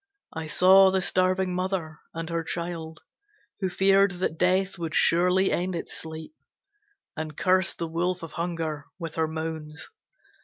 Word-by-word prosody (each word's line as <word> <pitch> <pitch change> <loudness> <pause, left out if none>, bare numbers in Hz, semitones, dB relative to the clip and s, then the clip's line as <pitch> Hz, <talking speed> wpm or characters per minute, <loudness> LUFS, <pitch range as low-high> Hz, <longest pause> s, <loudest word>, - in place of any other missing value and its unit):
I 160 0 -5
saw 190 +4 +6
the 190 0 +1
starving 185 0 +1
mother 180 -4 -3
and 165 0 -5
her 165 0 -1
child, 165 -1 -5 0.6
Who 190 -2 -1
feared 195 +1 +4
that 175 -3 -3
Death 185 +1 +1
would 165 -1 -3
surely 180 +3 +3
end 180 +1 -1
its 165 - -4
sleep, 160 - -7 0.8
And 155 -2 -6
cursed 185 0 +2
the 165 - -3
wolf 175 +2 -2
of 165 - -7
Hunger 165 -4 -3
with 165 -3 -6
her 160 -1 0
moans. 160 - -5
175 Hz, 150 wpm, -26 LUFS, 160-185 Hz, 0.8 s, saw